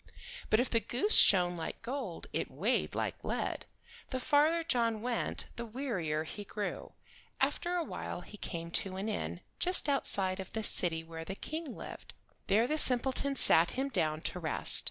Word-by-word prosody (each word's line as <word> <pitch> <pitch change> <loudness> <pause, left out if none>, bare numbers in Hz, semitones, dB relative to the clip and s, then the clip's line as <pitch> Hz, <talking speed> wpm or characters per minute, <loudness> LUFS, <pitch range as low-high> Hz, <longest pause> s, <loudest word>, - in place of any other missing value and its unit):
But 215 - +4
if 250 - +2
the 230 - +1
goose 255 - +4
shone 180 -2 +7
like 165 +5 -6
gold 235 -8 -5
it - - -2
weighed - - -1
like - - -3
lead. - - -3 0.4
The 260 - -3
farther 305 +5 +3
John 230 -8 0
went 245 -1 -2
the 235 - -3
wearier 210 - -3
he 205 +6 -8
grew. 205 +1 -5 0.5
After 350 0 0
awhile 345 -2 -4
he 210 - -12
came 170 -4 -6
to 190 -1 -7
an 195 +3 -3
inn, 85 - -3 0.2
just 365 -3 +7
outside 195 -9 +1
of 190 - -8
the 220 - -2
city 165 -5 -1
where 165 0 -8
the 190 +4 -6
King 315 +9 -5
lived. - - -10 0.3
There 220 +4 +3
the 310 +4 0
simpleton 265 +2 +2
sat 165 -9 +5
him 270 +2 -2
down 160 - -1
to 180 - -3
rest. 160 -2 +2
220 Hz, 175 wpm, -32 LUFS, 175-265 Hz, 0.5 s, shone